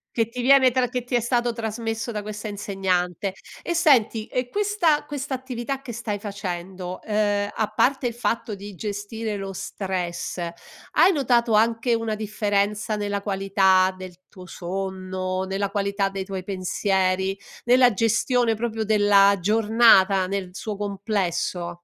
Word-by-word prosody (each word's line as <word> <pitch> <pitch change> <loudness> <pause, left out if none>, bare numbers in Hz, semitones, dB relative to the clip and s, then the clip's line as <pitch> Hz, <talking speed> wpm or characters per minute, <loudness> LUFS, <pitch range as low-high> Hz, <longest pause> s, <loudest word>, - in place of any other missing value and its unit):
Che 225 -2 +2
ti 245 +1 -6
viene 260 0 +6
tra 250 -1 +1
che 250 -1 -3
ti 245 - -2
è 240 - +3
stato 240 0 0
trasmesso 225 0 -3
da 210 -2 -3
questa 210 +1 -6
insegnante. 190 -2 -1 0.3
E 345 - -2
senti, 240 -9 +3
e 250 -1 -2
questa 400 -8 +1
questa 285 -2 -4
attività 260 +1 -5
che 240 -4 -7
stai 215 -3 -4
facendo, 185 -3 -5
uhm, 205 -1 +1
a 220 -2 0
parte 265 +2 +2
il 235 - -3
fatto 230 -2 -2
di 200 0 -8
gestire 210 +2 -4
lo 195 0 -5
stress, 185 -2 -4 0.5
hai 380 - +5
notato 240 -5 +2
anche 230 +2 +3
una 225 -1 -2
differenza 210 0 -1
nella 205 -1 -2
qualità 190 -1 +2
del 185 -1 -8
tuo 185 -1 -13
sonno, 185 0 -4
nella 195 +1 -2
qualità 200 0 0
dei 195 -1 -5
tuoi 190 -1 -5
pensieri, 190 0 0 0.3
nella 245 -1 +5
gestione 230 +3 +2
proprio 225 0 -2
della 205 -2 +5
giornata, 210 -2 +4
nel 195 -2 -3
suo 210 +2 -5
complesso? 190 -4 -2
205 Hz, 145 wpm, -24 LUFS, 195-235 Hz, 0.5 s, viene